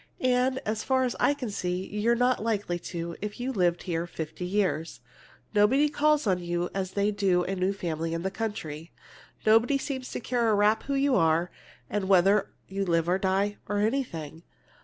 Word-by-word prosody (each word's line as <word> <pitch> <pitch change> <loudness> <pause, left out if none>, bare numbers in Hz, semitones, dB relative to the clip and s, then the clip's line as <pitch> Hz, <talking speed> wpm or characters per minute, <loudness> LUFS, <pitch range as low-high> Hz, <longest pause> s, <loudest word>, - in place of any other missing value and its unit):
And 255 +1 +2
as 215 +1 -2
far 260 -1 +2
as 250 - -1
I 285 - +3
can 250 -6 -5
see, 180 -1 -2
you're 210 +4 +1
not 245 0 +2
likely 205 -6 -1
to 170 -1 -4
if 210 +2 -5
you 255 +2 -2
lived 175 -6 +1
here 170 -2 -2
fifty 165 +1 -6
years! 180 -5 -1 0.5
Nobody 255 +8 +4
calls 300 0 +2
on 185 -3 +2
you 175 0 -2
as 190 -1 -3
they 200 +1 +1
do 195 -3 +2
on - - -5
a 195 - -1
new 185 +1 +1
family 165 -4 -3
in 165 - -4
the 190 - -1
country. 185 -8 -5 0.5
Nobody 225 +5 +4
seems 265 -2 -4
to - - -3
care 240 -1 0
a 215 - +4
rap 210 +2 +3
who 280 - -1
you 275 -1 +2
are, 165 0 +2 0.4
or 210 - +1
whether 195 +1 +3 0.2
you 195 +1 -2
live 170 -3 +1
or 180 +2 +2
die, 195 +2 0
or 205 - 0
anything. 205 - -2
200 Hz, 195 wpm, -27 LUFS, 175-235 Hz, 0.5 s, Nobody